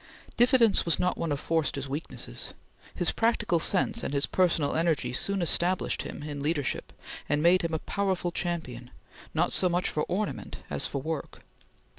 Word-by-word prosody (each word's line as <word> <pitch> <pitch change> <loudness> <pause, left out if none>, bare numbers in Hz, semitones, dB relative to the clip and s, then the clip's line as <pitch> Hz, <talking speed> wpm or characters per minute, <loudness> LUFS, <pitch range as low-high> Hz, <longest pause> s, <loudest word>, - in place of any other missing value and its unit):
Diffidence 240 -3 +5
was 170 - +2
not 180 0 +1
one 165 -2 -3
of 145 - -1
Forster's 145 -4 -1
weaknesses. 145 +4 -4 0.4
His - - +1
practical 225 -6 +1
sense 200 +7 +1
and 140 - -3
his 140 - +3
personal 170 -6 +1
energy 160 -7 0
soon 195 +8 +1
established 175 +2 +2
him - - -7
in 145 -1 -5
leadership, 145 -2 -2 0.4
and 145 +1 +1
made 180 +2 +5
him 165 -1 -2
a - - +1
powerful 190 0 -1
champion, 160 -9 -4 0.5
not - - +2
so 185 - +5
much 175 +1 +1
for 150 - -1
ornament 205 +3 -3
as 70 - 0
for 140 -2 -4
work. 160 -1 -5
165 Hz, 165 wpm, -28 LUFS, 145-185 Hz, 0.5 s, Diffidence